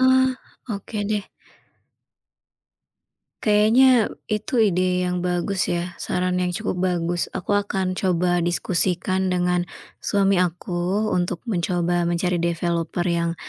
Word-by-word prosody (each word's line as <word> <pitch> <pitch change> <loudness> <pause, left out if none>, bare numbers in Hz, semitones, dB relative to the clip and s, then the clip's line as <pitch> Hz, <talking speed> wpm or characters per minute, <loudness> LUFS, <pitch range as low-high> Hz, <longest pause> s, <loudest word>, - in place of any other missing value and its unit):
Oh, 260 0 +5 0.4
oke 205 +2 -6
deh. 210 -2 -1 2.2
Kayaknya 225 +3 +5 0.2
itu 215 +7 -2
ide 180 -2 +1
yang 180 0 -1
bagus 180 +2 -1
ya 175 0 -2
saran 180 0 -1
yang 180 -1 -1
cukup 220 -3 -2
bagus. 175 -1 0
Aku 185 - -3
akan 195 -2 0
coba 180 -1 +1
diskusikan 180 +2 0
dengan, 180 -1 +1 0.3
suami 195 -2 +2
aku 180 +4 -1
untuk 175 -1 -1
mencoba 175 -3 0
mencari 175 +1 0
developer 170 0 -1
yang 170 -1 0
180 Hz, 110 wpm, -23 LUFS, 175-200 Hz, 2.2 s, Oh